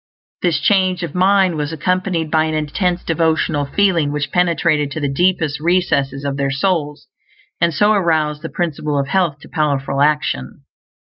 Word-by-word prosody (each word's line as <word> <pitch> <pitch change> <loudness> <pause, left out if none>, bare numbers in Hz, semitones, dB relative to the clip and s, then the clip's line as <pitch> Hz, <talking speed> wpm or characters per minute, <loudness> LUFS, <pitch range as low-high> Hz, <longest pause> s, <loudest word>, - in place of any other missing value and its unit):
This 170 -5 +1
change 185 -2 +1
of 165 -3 -5
mind 185 -2 +3
was 150 0 -3
accompanied 175 0 -1
by 160 -1 +3
an 155 0 -2
intense 175 +4 -1
devotional 160 -2 0
FEELING 170 -4 +1
which 150 -1 -3
penetrated 170 -4 +1
to - - -4
the 145 - -1
deepest 160 -2 +1
recesses 150 -5 0
of 140 -1 -2
their 140 -1 0
souls, 150 0 -2 0.5
and 170 0 +3
so 205 +6 +2
aroused 160 -7 +1
the 165 - -6
Principle 150 -4 -2
of 140 0 -2
Health 180 -7 +1
to - - -13
powerful 140 -3 -1
action. 145 - 0
160 Hz, 160 wpm, -18 LUFS, 145-180 Hz, 0.5 s, mind